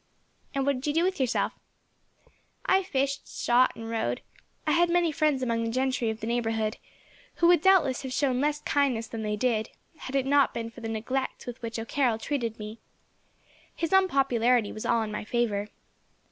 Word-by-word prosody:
"And 275 -1 +1
what 280 -2 +2
did 275 - -5
you 295 - +1
do 330 - +3
with 375 -2 0
yourself?" 255 -3 +1 1.1
"I 380 +1 +4
fished, 275 -6 -2
shot, 245 +2 +2
and 225 0 -7
rode. 220 - -2 0.4
I - - +1
had 345 0 +4
many 345 -1 +2
friends 295 -3 +1
among 230 -2 0
the 230 - -1
gentry 255 -1 0
of 220 0 -4
the - - -3
neighbourhood, 225 -2 -1 0.6
who - - +1
would, 345 -2 +6
doubtless, 335 -9 +4
have 265 - -6
shown 255 0 +1
less 295 0 0
kindness 265 -6 +1
than 225 0 -6
they 210 -1 -1
did, 220 -1 0 0.3
had 265 - -7
it 270 -1 +2
not 280 0 +3
been 230 -1 -4
for - - -12
the 225 - -4
neglect 255 +5 -3
with 245 0 -7
which 230 -1 -4
O'Carroll 230 +1 0
treated 230 -2 -3
me. 215 +1 -8 1.0
His 330 +1 -2
unpopularity 255 - +3
was 215 - -5
all 230 -1 +2
in 215 - -5
my 210 - -4
favour. 210 -3 -1
250 Hz, 190 wpm, -27 LUFS, 225-280 Hz, 1.1 s, would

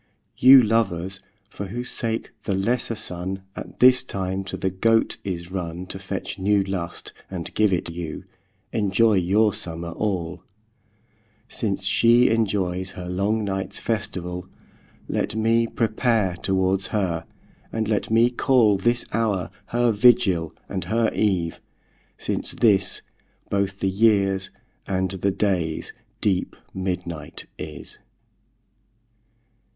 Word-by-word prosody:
You 130 0 +8
lovers, 95 -4 0 0.3
for 100 -1 -7
whose 120 +5 -5
sake, 115 -1 -2
the 100 - 0
lesser 115 +4 0
Sunne 95 -2 -3
At - - -9
this 130 0 +6
time 95 -4 -3
to 95 - -4
the 95 - -1
Goat 115 +4 +2
is 90 -2 -5
runne 90 -1 -4
To 95 - -5
fetch 95 0 -5
new 100 +1 +3
lust, 95 -3 -5 0.2
and 90 -3 -5
give 105 -2 +3
it 90 - 0
you, 85 -2 -6 0.5
Enjoy 110 +1 +3
your 100 +3 +3
summer 85 -1 -4
all; 90 -3 -2 1.1
Since 100 -3 -2
shee 120 +4 +5
enjoyes 95 -4 0
her 90 -1 -7
long 100 +5 0
nights 95 -1 -2
festivall, 90 -5 -3 0.6
Let - - -1
mee 115 +1 +2
prepare 110 -4 +1
towards 95 0 +1
her, 90 -6 -1 0.5
and 110 -1 -1
let 105 -1 0
mee 115 +2 +4
call 120 -6 +3
This 120 +4 +1
houre 105 -5 0 0.2
her 120 0 +2
Vigill, 105 -7 +4 0.2
and 95 -2 -4
her 115 +5 +1
Eve, 90 -6 0 0.6
since - - -3
this 100 -5 +2 0.5
Bothe 100 -1 0
the - - 0
yeares, 95 -1 +2 0.4
and 95 -1 0
the 100 0 0
dayes 90 -5 -1 0.3
deep 95 -3 0 0.2
midnight 90 -4 -4
is. - - -8
95 Hz, 125 wpm, -24 LUFS, 95-110 Hz, 1.1 s, You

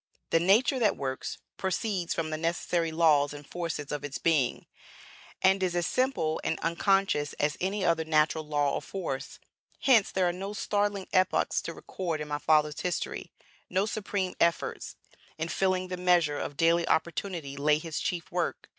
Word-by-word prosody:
The 165 - +5
nature 220 +9 +4
that 215 -4 +2
works, 130 -1 -4 0.2
proceeds 190 -2 -1
from 155 -1 -2
the - - -1
necessary 170 0 -1
laws 150 -3 +3
and 145 0 -9
forces 165 -3 -4
of 145 -1 -3
its 145 -2 -4
being, 150 -7 +1 0.8
and 190 +1 +4
is 180 -2 0
as 175 -1 +1
simple 255 -10 0
and 160 - -1
unconscious 170 -2 +1
as 150 0 0
any 190 +1 0
other 165 -1 +2
natural 155 0 +2
law 145 -2 +1
or - - -1
force. 165 -9 -5 0.4
Hence 235 -7 +5
there 185 -1 +2
are 175 - 0
no 195 +3 -5
startling 205 -1 -1
epochs 185 0 +2
to - - -5
record 170 -5 -4
in 150 - -5
my 145 0 -2
father's 150 -1 +2
history, 180 -2 -3 0.4
no 190 +2 +1
supreme 200 -3 -2
efforts; 170 0 0 0.4
in 160 +1 -3
filling 185 0 0
the 180 - -3
measure 175 -5 +3
of 145 - -5
daily 165 +2 +3
opportunity 165 -3 -1
lay 150 +2 +3
his 155 0 -4
chief 175 -2 -3
work. - - -2
170 Hz, 170 wpm, -29 LUFS, 150-190 Hz, 0.8 s, The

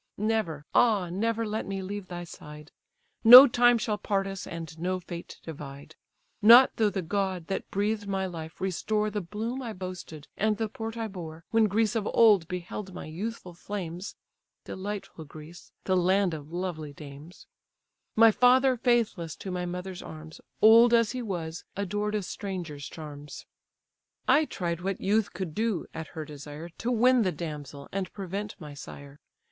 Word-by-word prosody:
Never, 210 -9 -1
ah, 205 -7 +3
never 225 +4 -1
let 215 +1 -3
me 195 -1 -4
leave 200 0 -6
thy 175 -1 -6
side! 150 -2 -11 0.5
No 250 +4 +13
time 240 -2 +4
shall 210 -1 -2
part 195 -1 0
us, 195 -1 -6
and 165 -1 -7
no 185 +2 -1
fate 175 -1 -9
divide, 140 -3 -9 0.5
Not 235 +5 +9
though 220 -2 +3
the 190 -2 -3
god, 190 -1 -2
that 195 - -3
breathed 205 +1 -1
my 195 -1 -1
life, 160 -3 -7
restore 210 +3 -1
The 210 0 -2
bloom 220 +8 -4
I 235 -3 -5
boasted, 180 -5 -8
and 215 0 +1
the 220 -1 -2
port 225 +1 -6
I 225 -1 -2
bore, 165 -4 -9
When 225 -1 +4
Greece 215 +3 +1
of 215 -2 -1
old 210 -8 +6
beheld 180 +2 -6
my - - -7
youthful 180 +3 -6
flames 180 0 -6 0.5
(Delightful 195 -4 -6
Greece, 155 +3 -13
the 185 - +1
land 185 0 +2
of 150 0 -8
lovely 170 -4 -4
dames), 145 +3 -12 0.7
My 225 0 +7
father 255 +3 +4
faithless 225 -9 0
to 190 - -7
my 180 0 -3
mother's 180 +1 -6
arms, 155 0 -10 0.2
Old 230 +2 +8
as 230 -2 +3
he 255 0 -4
was, 175 -7 -5
adored 205 +2 -2
a 210 - -1
stranger's 175 -8 -6
charms. 150 -2 -9 0.8
I 310 +2 +5
tried 170 - -3
what 195 +1 -2
youth 210 +2 +1
could 185 -5 -5
do 220 -3 -1
(at 160 -1 -6
her 155 - -4
desire) 150 +2 -9
To 230 +8 -5
win 250 +1 +4
the 190 -4 +1
damsel, 150 -4 -7
and 195 -1 -3
prevent 200 +1 -5
my 150 -4 -9
sire. 140 0 -11
190 Hz, 165 wpm, -28 LUFS, 165-215 Hz, 0.8 s, No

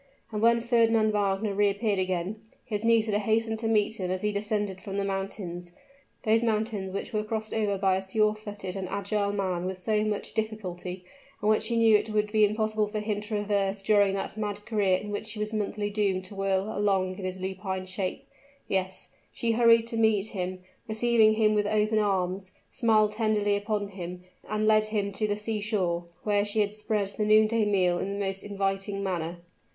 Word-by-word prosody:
And 210 -1 -3
when 235 +1 +4
Fernand 230 -2 +3
Wagner 205 0 0
reappeared 205 0 +1
again, 185 +2 -2 0.3
his 215 -4 -3
Nisida 225 -2 +3
hastened 220 +1 0
to 225 - -2
meet 220 0 +2
him 185 -1 -2
as 185 +1 -2
he 210 - +1
descended 205 -2 -2
from 195 0 -5
the 200 - 0
mountains 190 -3 -4 0.5
those 225 -1 +3
mountains 215 -4 -1
which 195 - -5
were 215 0 0
crossed 220 0 -3
over 210 -3 0
by 190 -1 +2
a - - -2
surefooted 210 -1 -1
and 190 -2 -4
agile 200 0 -1
man 185 -3 -1
with 190 0 -3
so 210 +3 0
much 210 -1 -3
difficulty, 185 -5 -4 0.3
and 210 +1 +2
which 215 - +2
he 235 - -1
knew 225 -1 +5
it 210 - +1
would 210 -1 0
be 215 -1 +4
impossible 215 0 +1
for 210 +1 -3
him 210 -1 -2
to 210 - -9
traverse 205 -2 -1
during 200 -2 +4
that 195 - -4
mad 210 -1 -4
career 200 -5 +2
in 210 +2 -7
which 215 +1 -4
he 215 - -8
was 210 +1 -2
monthly 205 -1 -2
doomed 195 -3 0
to 185 - -9
whirl 195 +2 -1
along 190 -2 +1
in - - -6
his 185 0 -3
lupine 190 0 -4
shape 185 +7 -4 0.4
yes, 190 -1 -2 0.2
she 230 - -1
hurried 230 0 +5
to 230 0 -4
meet 220 -2 +2
him 185 -1 -4 0.2
receiving 220 -1 +4
him 215 -1 +3
with 210 -1 +1
open 215 +1 +2
arms 190 -2 -1 0.2
smiled 215 -2 +3
tenderly 210 -2 +1
upon 205 0 -2
him 180 -2 -7 0.3
and 215 +1 0
led 215 0 +4
him 210 -2 -1
to 215 +2 -1
the 205 0 -1
sea 215 0 -2
shore, 185 -5 -1 0.2
where 205 -1 +2
she 210 +1 0
had 205 0 0
spread 210 -2 -1
the 210 +2 -3
noonday 215 +1 +4
meal 185 -4 +2
in 195 - -2
the 200 - -4
most 195 0 -3
inviting 195 0 -2
manner. 175 -3 -2
205 Hz, 195 wpm, -28 LUFS, 195-215 Hz, 0.5 s, knew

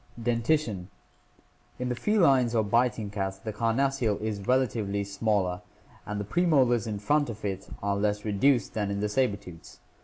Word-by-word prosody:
Dentition. 115 - 0 0.5
— - - -35
In 125 0 -2
the 125 - -1
felines 135 - +3
or 110 - +3
biting 110 -1 +1
cats 95 -2 -3
the 110 +2 -6
carnassial 115 0 +1
is 110 -1 -3
rela 130 +6 +2
tively 100 -3 -3
smaller 100 -2 0 0.5
and 105 0 -3
the 100 - -3
premolars 130 - +2
in 105 -2 -3
front 145 +7 +1
of 110 -2 -7
it 95 -1 -4
are 100 0 +1
less 105 +1 -1
reduced 110 +3 +2
than 105 -2 -1
in 100 0 -2
the 105 +1 -1
saber 105 -2 +1
tooths. 90 -3 -13
110 Hz, 175 wpm, -28 LUFS, 100-125 Hz, 0.5 s, felines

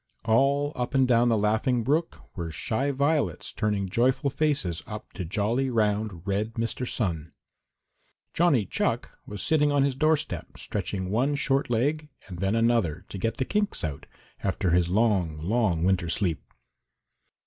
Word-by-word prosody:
All 140 +6 +2
up 125 +1 -3
and 130 -1 +4
down 120 -1 +4
the 115 - +3
Laughing 110 +4 +1
Brook 155 +7 -1
were 85 -2 -4
shy 130 - -1
violets 140 - 0
turning 105 -2 -1
joyful 130 +7 +1
faces 140 - 0
up 105 0 -8
to 95 - -5
jolly, 110 +9 0
round, 105 -6 0
red 105 +3 -1
Mr. 115 +2 -2
Sun. 85 -8 -2 1.0
Johnny 150 - +3
Chuck - - -1 0.2
was 105 -1 -5
sitting 150 -2 +3
on 140 -1 +3
his 140 -1 +1
doorstep, 155 +2 -1
stretching 95 -1 -3
one 130 +7 +1
short 135 -1 +1
leg 145 +6 0 0.2
and 90 -3 -8
then 95 +3 +1
another, 115 -8 +1
to 100 - -6
get 115 +3 -1
the 130 - 0
kinks 205 +4 -1
out, 75 -4 -4 0.4
after 95 -2 0
his 85 0 +3
long, 95 -6 +1
long 90 0 0
winter 90 -2 +1
sleep. 85 -2 0
115 Hz, 155 wpm, -27 LUFS, 95-135 Hz, 1.0 s, and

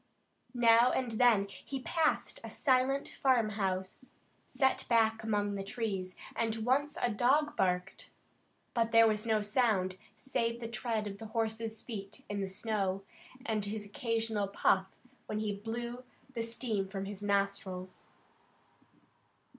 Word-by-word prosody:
Now 235 0 +6
and 250 -3 -1
then 225 -3 +4
he 270 +6 -6
passed 325 - +1
a - - -6
silent 265 +1 +2
farm 250 -5 +2
house, 190 +2 -3 0.4
set 265 -1 +1
back 225 -2 +3
among 205 -2 0
the 195 -1 -3
trees, 195 -3 -3 0.2
and 225 -1 0
once 285 +5 +2
a 240 - +1
dog 275 +8 +2
barked, 180 0 -1 0.6
but 230 -1 +1
there 230 0 +7
was 215 +1 0
no 215 -2 +2
sound, 205 -4 +1 0.2
save 230 -1 -1
the 230 - -4
tread 225 -1 -2
of 200 -1 -6
the 225 - -7
horse's 225 0 -2
feet 210 -3 -7
in 205 -1 -2
the 195 - -1
snow, 195 -1 -1 0.4
and 215 -2 0
his 205 0 -4
occasional 225 -1 -1
puff 190 -1 +2 0.4
when 210 - -2
he 215 -1 -1
blew 235 +4 -5 0.3
the 235 - -2
steam 230 -3 -2
from 195 0 -4
his 200 0 -7
nostrils. 200 -2 -2
220 Hz, 140 wpm, -32 LUFS, 200-235 Hz, 0.6 s, there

